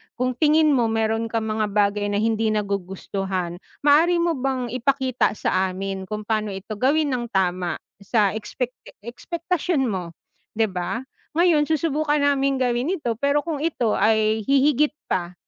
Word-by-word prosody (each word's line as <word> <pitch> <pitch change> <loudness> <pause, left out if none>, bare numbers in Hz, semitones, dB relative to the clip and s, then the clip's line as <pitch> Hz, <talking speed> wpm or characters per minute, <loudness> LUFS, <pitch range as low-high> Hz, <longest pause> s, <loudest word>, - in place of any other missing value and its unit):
kung 255 +1 0
tingin 305 +3 +3
mo 240 -4 +3
meron 225 0 0
kang 225 0 -2
mga 215 0 0
bagay 205 0 +1
na 205 - -1
hindi 225 0 +1
nagugustuhan, 195 -3 -3 0.2
maaari 320 +5 +5
mo 330 -5 0
bang 255 -3 -2
ipakita 255 -2 +1
sa 190 -1 +1
amin 190 0 -5
kung 215 +1 -4
paano 215 0 -1
ito 195 +3 -6
gawin 285 +3 +2
ng 245 -1 -1
tama 180 -3 0 0.2
sa 205 0 +2
expecta 245 +4 -5
ekspektasyon 335 - -2
mo, 185 -7 -3 0.4
'di 220 0 +2
ba? 185 +5 -3 0.3
Ngayon 330 -3 +4
susubukan 305 -1 0
naming 275 -2 +2
gawin 250 +7 +1
ito, 240 - -2
pero 280 +3 +2
kung 320 -1 -3
ito 280 -7 0
ay 220 0 +2
hihigit 280 +2 +3 0.2
pa 175 0 -1
230 Hz, 150 wpm, -23 LUFS, 205-285 Hz, 0.4 s, maaari